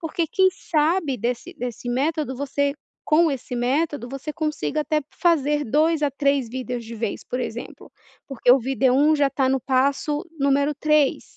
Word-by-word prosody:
porque 335 0 -2
quem 375 +4 +3
sabe, 310 -4 0
desse 235 +2 -3
desse 245 0 -5
método 280 +1 -1
você 285 +1 -1 0.3
com 320 +1 +4
esse 255 -2 -5
método, 270 +2 -1
você 275 +3 -5
consiga 305 0 -2
até 305 0 0
fazer 295 -4 +1
2 305 +5 +1
a 290 - +2
3 280 -3 0
vídeos 250 -1 -4
de 230 +1 -9
vez, 225 -2 -4
por 250 - -4
exemplo, 235 -1 -7 0.3
porque 255 -2 +1
o 255 - +7
vídeo 260 0 +1
1 295 +3 +4
já 290 -2 +3
está 275 -1 0
no 265 0 +1
passo 280 +4 0 0.2
número 280 +1 +2
3, 305 -1 +1
280 Hz, 170 wpm, -23 LUFS, 255-305 Hz, 0.3 s, o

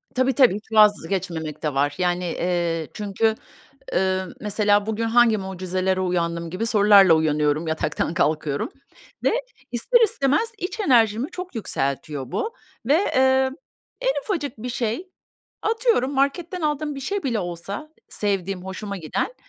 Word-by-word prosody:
Tabii 260 +1 +2
tabii, 255 -8 +5
hiç 215 +2 -9
vazgeçmemek 175 -7 +2
de 150 -3 -1
var. 145 +1 +1
Yani, 180 0 0
eee, 170 -2 -1
çünkü, 215 +2 0 0.6
eee, 190 0 +1 0.2
mesela 205 0 +2
bugün 220 +1 -1
hangi 230 -1 +4
mucizelere 185 0 -2
uyandım 170 -2 -1
gibi 185 +6 -2
sorularla 205 -5 +6
uyanıyorum, 150 0 +1
yataktan 160 +1 -1
kalkıyorum. 155 -4 0 0.6
Ve - - +4 0.4
ister 475 - +3
istemez 380 - +1
iç 365 +5 -4
enerjimi 240 - +3
çok 365 -2 -7
yükseltiyor 140 - -3
bu 455 +2 -2 0.3
ve, 280 - +4
eee, 265 -6 +3 0.5
en - - +1
ufacık 295 - -3
bir 245 - -5
şey, 235 - -2 0.5
atıyorum, 445 - +1
marketten 325 +6 0
aldığım 300 -1 -1
bir 275 - -6
şey 395 +8 -2
bile 245 -5 0
olsa 185 - -5 0.2
sevdiğim, 195 -2 -2
hoşuma 200 +1 -5
giden, 185 - -3
210 Hz, 135 wpm, -23 LUFS, 175-270 Hz, 0.6 s, sorularla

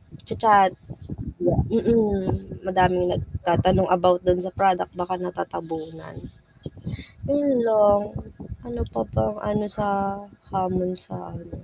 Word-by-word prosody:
nag-cha-chat. 200 -4 +3 1.0
Mm, 220 -4 +2 0.4
madaming 180 -1 +3
nagtatanong 185 +2 +1
about 180 0 +4
dun 180 0 +3
sa - - -3
product 190 -2 +2
baka 180 +1 -3
natatabunan. 160 -2 -7 1.1
Yun 280 -2 +1
lang, 205 -2 +5 0.7
ano 240 0 -6
pa 115 - -1
bang 110 -1 -1
ano 210 0 -1
sa 205 - 0 0.7
hamon 185 -1 -1
sa - - -9 0.2
ano, - - -13
185 Hz, 105 wpm, -23 LUFS, 180-210 Hz, 1.1 s, lang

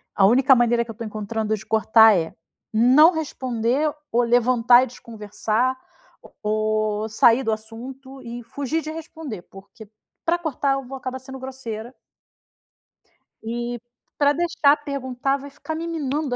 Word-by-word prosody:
A 195 - +5
única 265 +4 +5
maneira 240 0 +2
que 225 - -8
eu - - -9
estou 230 +1 -7
encontrando 215 +1 -2
de 215 - -11
cortar 220 -1 +5
é: 160 -1 -3 0.4
não 260 +9 +6
responder, 260 -1 -1 0.2
ou 240 +1 +3
levantar 240 +1 +4
e - - -2
desconversar, 225 +2 -2 0.7
ou 215 0 0
sair 235 +4 +4
do 225 - 0
assunto 255 +5 -8
e 240 0 -8
fugir 285 +6 -3
de 310 - -6
responder, 315 - -8
porque 200 +2 -15 0.4
pra 340 +1 +2
cortar 280 -4 -1
eu 270 0 -3
vou 270 +1 -7
acabar 260 0 -5
sendo 265 0 -10
grosseira. 255 -3 -7 1.5
E 240 +1 -4 0.4
pra 285 0 +3
deixar 300 -3 +3
perguntar 270 -1 -2
vai 280 +1 -10
ficar 315 +3 -7
me 335 +1 -4
minando 295 -4 -2
245 Hz, 145 wpm, -23 LUFS, 220-275 Hz, 1.5 s, não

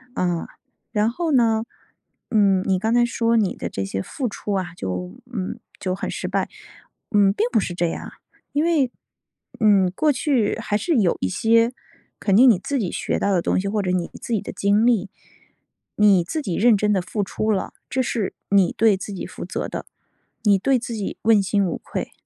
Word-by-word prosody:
呃， 175 -2 -1 0.4
然 215 -1 +2
后 325 +7 -2
呢， 225 -4 +3 0.7
嗯， 200 -4 +3
你 190 -1 +1
刚 220 +4 0
才 240 0 +4
说 230 -1 +1
你 205 -4 +1
的 - - -5
这 95 - -3
些 95 0 -3
付 255 - -4
出 205 0 -4
啊 185 -3 -2
就 90 - -5
嗯， 190 -5 -4 0.2
就 185 -2 -2
很 190 - -4
失 - - -4
败， - - -1 0.6
嗯， 200 -3 +4
并 - - +1
不 230 - +3
是 185 - -3
这 175 0 +1
样， - - -5 0.4
因 295 - +2
为， 310 -7 +2 0.7
嗯， 200 -4 +4
过 305 +6 +3
去 265 -5 +1
还 210 -2 -1
是 335 +8 0
有 195 -8 +3
一 95 - 0
些 230 - +3 0.5
肯 195 - +1
定 255 +5 +8
你 220 - +5
自 275 +9 -2
己 190 -7 -2
学 - - -2
到 200 - +1
的 180 - +2
东 - - +1
西， 195 - -2
或 210 +1 0
者 180 - 0
你 180 -2 -1
自 235 - -4
己 215 - +1
的 - - -6
经 205 +3 +2
历， 220 -5 +2 0.9
你 200 -4 +5
自 310 - -3
己 190 - -3
认 235 0 +5
真 210 +1 +1
地 190 - +1
付 205 +3 -3
出 215 +3 -1
了， 195 -3 -1 0.2
这 260 - 0
是 230 -5 -2 0.2
你 195 -3 +4
对 220 -3 +4
自 200 +2 -7
己 190 - -5
负 - - -8
责 - - -4
的， - - -5 0.6
你 205 -3 +5
对 265 +7 +2
自 235 0 -6
己 205 -3 -4
问 220 -2 +5
心 195 +1 +1
无 175 - -2
愧。 - - -5
210 Hz, 220 characters per minute, -22 LUFS, 190-230 Hz, 0.9 s, 定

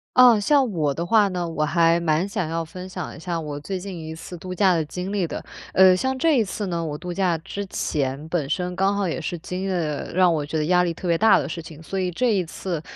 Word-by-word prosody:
啊， 245 -4 +8
像 265 +1 +3
我 155 -5 0
的 170 +4 -3
话 210 +2 +4
呢， 180 -2 -2
我 160 -2 -1
还 165 +2 +3
蛮 165 +2 +1
想 185 -5 -2
要 165 0 -2
分 180 +3 -9
享 180 -3 -6
一 - - -11
下 170 0 -3
我 145 -2 -5
最 185 +5 -4
近 190 -1 -7
一 160 0 -6
次 175 - -9
度 185 +2 -6
假 185 0 +4
的 165 - +1
经 180 +6 -5
历 190 -4 0
的。 - - -6 0.3
呃， 185 -1 +7
像 260 +7 -1
这 310 0 +3
一 225 - +4
次 205 +1 -4
呢， 170 -2 -2
我 150 -2 -4
度 180 +2 -6
假 175 -2 +1
之 195 +5 -6
前， 140 -3 -2
本 160 -5 -2
身 180 +1 -2
刚 195 +2 +2
好 200 -2 0
也 170 +1 -3
是 175 +2 -3
经 180 +3 -5
历 - - -2
了 155 -5 -2
让 180 -1 +4
我 150 -2 -1
觉 160 +2 -3
得 150 - 0
压 180 +1 +4
力 170 -1 -1
特 180 - -6
别 170 - +3
大 220 +3 +6
的 - - -1
事 170 - -5
情， 160 -1 -11
所 195 +4 -3
以 185 -1 0
这 240 +6 +1
一 185 - +1
次 170 -1 -5
180 Hz, 290 characters per minute, -23 LUFS, 160-190 Hz, 0.3 s, 啊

